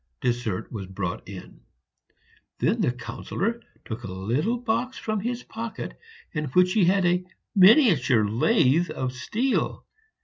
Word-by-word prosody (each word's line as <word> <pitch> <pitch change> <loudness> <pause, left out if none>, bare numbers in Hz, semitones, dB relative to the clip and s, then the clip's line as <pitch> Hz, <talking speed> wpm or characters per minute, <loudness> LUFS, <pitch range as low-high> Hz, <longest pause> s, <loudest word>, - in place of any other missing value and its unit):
Dessert 120 -6 -2
was 100 -5 -6
brought 95 -1 -5
in; 95 -2 -10 1.0
then - - +1
the - - +2
Councillor 195 - -4 0.2
took 110 - -6
a 95 - -6
little 120 - -1
box 240 +2 -2
from 215 -1 -2
his 240 +4 -3
pocket, 225 0 -6 0.4
in 150 -2 -2
which 180 +6 +3
he 210 -5 +4
had 190 +1 +3
a 180 +1 +2 0.3
miniature 185 - +6
lathe 150 - +3
of 130 -1 -3
steel. 225 - -1
175 Hz, 135 wpm, -25 LUFS, -, 1.0 s, miniature